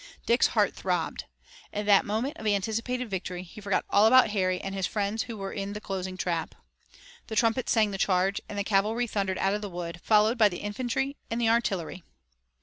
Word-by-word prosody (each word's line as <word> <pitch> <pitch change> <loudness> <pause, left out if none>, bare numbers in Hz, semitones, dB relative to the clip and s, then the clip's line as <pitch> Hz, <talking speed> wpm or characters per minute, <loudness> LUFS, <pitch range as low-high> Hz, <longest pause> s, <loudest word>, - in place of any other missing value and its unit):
Dick's 235 +2 +4
heart - - +3
throbbed. - - -2 0.5
In 210 0 -3
that 200 -1 +5
moment 225 +8 -1
of 220 - -5
anticipated 225 +5 -1
victory 180 -2 -4
he 200 +4 -12
forgot 200 -1 0
all 205 +2 +6
about 255 -2 +6
Harry 185 -3 0
and 195 - -5
his 195 -2 -1
friends 210 +1 -1
who 230 -3 -6
were 195 -1 -5
in 200 0 -4
the 210 - -5
closing 190 -2 -5
trap. 170 -3 -2 0.7
Then 220 - -5
trumpets 230 +3 +2
sang 215 -3 +3
the 195 - -5
charge, 190 +1 +1
and 205 - -6
the 200 - 0
cavalry 215 +4 +1
thundered 195 -4 -2
out 195 +1 +1
of 210 - -2
the 205 - -5
wood, 175 -1 -6
followed 215 +2 +3
by 215 -2 +6
the 175 - -6
infantry 255 +6 -2
and 230 - -2
the 230 -1 +2
artillery. 195 -7 0
205 Hz, 205 wpm, -28 LUFS, 195-225 Hz, 0.7 s, all